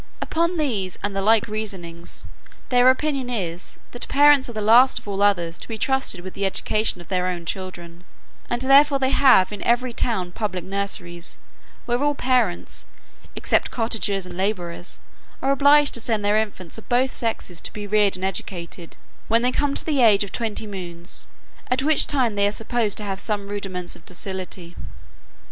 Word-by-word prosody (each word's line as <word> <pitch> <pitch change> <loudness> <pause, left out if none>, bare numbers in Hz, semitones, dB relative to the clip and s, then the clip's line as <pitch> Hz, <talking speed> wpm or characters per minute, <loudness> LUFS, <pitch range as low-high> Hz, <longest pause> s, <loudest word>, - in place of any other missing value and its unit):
Upon 335 +2 -1
these, 215 - -2
and 205 -1 -2
the 195 - 0
like 220 +2 +4
reasonings, 190 -6 -6 0.4
their 250 0 +5
opinion 270 -1 0
is, 180 -7 -4
that 245 - -4
parents 290 -2 +5
are - - -7
the 215 - -4
last 235 +5 +5
of - - -6
all 200 -1 -3
others 175 -5 +1
to - - -5
be 225 - -5
trusted 265 -6 -1
with 185 +1 -8
the 200 - -4
education 215 +1 0
of 170 - -14
their 185 -1 0
own 175 -2 -4
children; 175 -1 -6 0.5
and 240 +1 -1
therefore 275 +2 +6
they 265 0 0
have 250 -9 +5
in 205 - -7
every 240 +1 +1
town 190 -7 -1
public 185 -4 -3
nurseries, 190 -3 -4 0.5
where 240 +1 0
all 290 0 +1
parents, 250 - -1 0.5
except - - +1
cottagers 215 -4 -1
and 180 -1 -9
labourers, 180 -3 -3 0.4
are 270 - +1
obliged 285 +1 +5
to 235 - -1
send 220 -3 -1
their 205 +1 +3
infants 205 -3 -4
of - - -17
both 255 +1 +2
sexes 220 -7 -3
to - - -4
be 210 -1 -7
reared 205 -1 +3
and 185 +1 -2
educated, 175 -3 -5 0.3
when 230 +1 +3
they 250 - +2
come 280 +1 0
to - - +1
the 290 -5 +1
age 210 -4 +5
of 200 - -7
twenty 225 -2 -3
moons, 180 -4 -6 0.4
at 255 +1 +1
which 310 +1 +5
time 255 -6 +1
they 200 0 +2
are - - 0
supposed 225 -1 -1
to 210 - -4
have 195 -2 -4
some 205 -1 -3
rudiments 195 -3 -4
of - - -17
docility. 180 -1 -4
210 Hz, 185 wpm, -22 LUFS, 185-250 Hz, 0.5 s, therefore